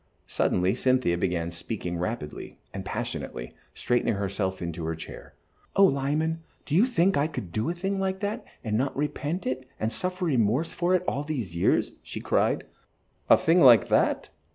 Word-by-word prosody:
Suddenly 90 +2 +1
Cynthia 130 -7 +2
began 85 -2 -1
speaking 90 +1 -4
rapidly 90 -5 -5 0.2
and - - -5
passionately, - - -4 0.2
straightening 120 -2 +1
herself 95 -1 -2
in 85 -2 -3
her 80 -1 -3
chair. 80 - -10 0.4
"Oh, 195 - +7
Lyman, 155 +2 0 0.2
do 150 - -5
you 200 +10 +5
think 190 -5 +2
I 145 +2 +2
could 105 - -6
do 110 - -1
a 175 - -2
thing 195 +2 -2
like 190 0 -1
that, 205 +1 -2 0.2
and 110 -3 -1
not 135 +5 0
repent 150 +4 -2
it 130 0 -3
and 110 +1 -1
suffer 185 0 -2
remorse 130 +1 +1
for 180 +1 +2
it 180 - +1
all 140 - 0
these 130 - -4
years?" 85 - +2
she - - -7
cried. - - +1 0.7
"A - - +9
thing 165 +3 +3
like 120 -5 +7
that?" - - +2
130 Hz, 175 wpm, -27 LUFS, -, 0.7 s, A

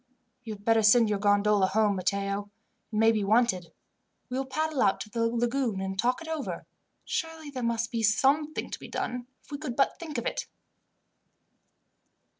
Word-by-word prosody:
"You 225 -3 -5
had 205 0 -18
better 225 -1 +4
send 220 +1 +5
your 205 - 0
gondola 205 -1 +3
home, 210 0 +2
Matteo. 200 +2 -1 0.4
It - - -5
may 225 +1 +5
be 215 -2 0
wanted. 205 -4 +2 0.6
We 250 - -3
will 270 - -3
paddle 310 +1 -1
out 195 - +3
to 215 - -8
the 230 0 +1
lagoon 235 -2 0
and 190 0 -3
talk 250 +7 +1
it - - -10
over. 320 -3 -4 0.4
Surely 325 -3 -4
there 260 -2 -5
must 235 -1 -1
be 230 -2 -1
something 275 +8 +2
to - - -5
be - - -9
done, 250 0 -4 0.2
if - - -22
we 285 - -4
could 280 -6 -4
but 275 - +1
think 315 -5 -6
of 235 - -3
it. - - -2
230 Hz, 185 wpm, -28 LUFS, 205-270 Hz, 0.6 s, send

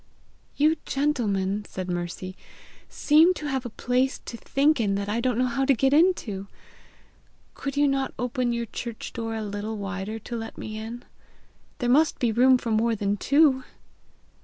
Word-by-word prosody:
"You 310 +3 +3
gentlemen," 210 -9 0
said 185 -1 -5
Mercy, 175 +1 -4 0.5
"seem 320 +5 +4
to 305 - -6
have 265 -3 -2
a - - -7
place 250 +4 0
to - - -6
think 280 +5 +1
in 200 -3 +1
that 200 0 -2
I 220 +3 -1
don't 250 -2 0
know 255 - +2
how 250 +2 0
to 270 0 +4
get 270 +3 +2
into! 285 - +2 1.1
Could 280 0 -5
you 290 0 +4
not 275 -1 0
open 245 0 -1
your 235 0 -2
church 230 0 -7
door 225 -1 -4
a 220 - -3
little 210 +1 -4
wider 200 +1 -4
to 235 +2 -7
let 225 -1 -6
me 215 - -6
in? 225 +3 -7 0.7
There 245 - -2
must 295 +5 +4
be 240 -2 +1
room 255 +3 +5
for 235 -2 -4
more 225 +1 +2
than 200 -1 0
two!" 280 +3 +3
235 Hz, 175 wpm, -25 LUFS, 215-270 Hz, 1.1 s, room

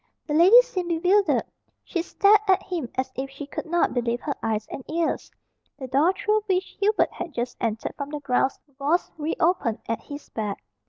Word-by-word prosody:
The 295 - -3
lady 365 +10 +8
seemed 370 -8 -4 0.2
bewildered. 395 +2 +3 0.4
She 345 - -2
stared 405 +4 +4
at 380 -1 +4
him 335 -10 -4
as 260 0 -1
if 270 +1 -4
she 275 +1 -8
could 285 - -6
not 345 +1 +1
believe 240 -1 0
her 290 - -2
eyes 220 -1 -1
and 265 - -6
ears. 330 +1 -1 0.5
The 265 - -6
door 280 +8 +3
through 425 +2 +1
which 375 -1 -1
Hubert 420 +2 +2
had 335 - -7
just 240 +1 -3
entered 225 -1 -2
from 280 -1 -4
the 300 0 -4
grounds 270 -1 +1 0.2
was 305 +6 +1
re 305 +2 -1
opened 320 - +2
at 230 - -2
his 285 0 -9
back. 210 -3 -4
300 Hz, 195 wpm, -25 LUFS, 260-365 Hz, 0.5 s, lady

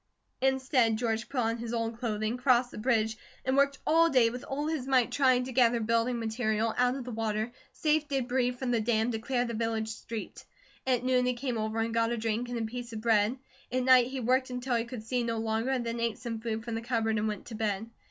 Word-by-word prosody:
Instead 260 -4 +2
George 225 0 -1
put 270 -3 0
on 230 0 0
his 235 0 -3
old 230 0 -2
clothing, 215 -1 -1
crossed 250 -1 +3
the - - -9
bridge, 220 -2 +1 0.3
and 260 +1 +1
worked 280 0 +3
all 330 +1 +5
day 245 -6 +4
with 245 +1 -7
all 285 +2 -3
his 305 -5 -2
might 255 -3 +3
trying 255 -3 +3
to 260 - -6
gather 240 -1 +4
building 230 +2 +1
material 220 -1 0
out 250 +1 +2
of 270 - -5
the 250 - -6
water, 220 0 -2 0.2
save 305 -1 +1
debris 255 -2 0
from 250 0 -3
the 235 -2 +2
dam, 225 +1 +1
to 220 - -2
clear 245 +1 0
the 235 - -4
village 225 -1 -1
street. 220 0 -7 0.4
At 250 -2 +2
noon 255 -1 +2
he 250 - +1
came 250 0 -3
over 220 +1 -2
and 225 0 -1
got 230 0 +2
a 240 - -1
drink, 225 +2 -2
and 245 - -3
a 230 - -1
piece 240 +2 -5
of 220 - -4
bread. 220 +1 +3 0.3
At 255 0 0
night 255 -1 +6
he 265 +1 -4
worked 255 +2 +1
until 250 0 -3
he 230 -1 +1
could 240 -2 -7
see 245 +2 -1
no 230 -1 -1
longer, 225 +2 -1
and 255 -3 0
then 230 0 -3
ate 230 -2 -1
some 230 -2 -5
food 225 0 -3
from 235 - -4
the 225 - -2
cupboard 225 -2 0
and 215 - 0
went 210 -2 -4
to 235 - -9
bed. 215 -1 -1
235 Hz, 240 wpm, -29 LUFS, 225-255 Hz, 0.4 s, night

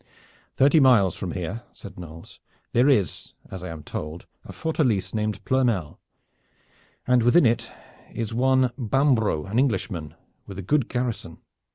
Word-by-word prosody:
"Thirty 145 +4 +5
miles 115 - +5
from 90 -4 -5
here," 95 +6 -4
said 95 -2 -12
Knolles, 80 -1 -11 0.3
"there 125 +4 +4
is, 105 - 0 0.2
as 95 - -7
I 90 - -6
am 80 -2 -8
told, 75 +3 -6 0.2
a - - -10
fortalice 130 - -1
named 105 -3 -2
Ploermel, 120 - 0 1.1
and 125 -1 +3
within 120 +7 +5
it 115 0 +1 0.4
is 115 -1 -4
one 130 +1 +3
Bambro', 120 - +1
an 105 +5 -1
Englishman, 100 - -1 0.3
with 95 - -9
a 100 - -5
good 140 - +1
garrison. 120 -9 -3
110 Hz, 145 wpm, -24 LUFS, 90-130 Hz, 1.1 s, Thirty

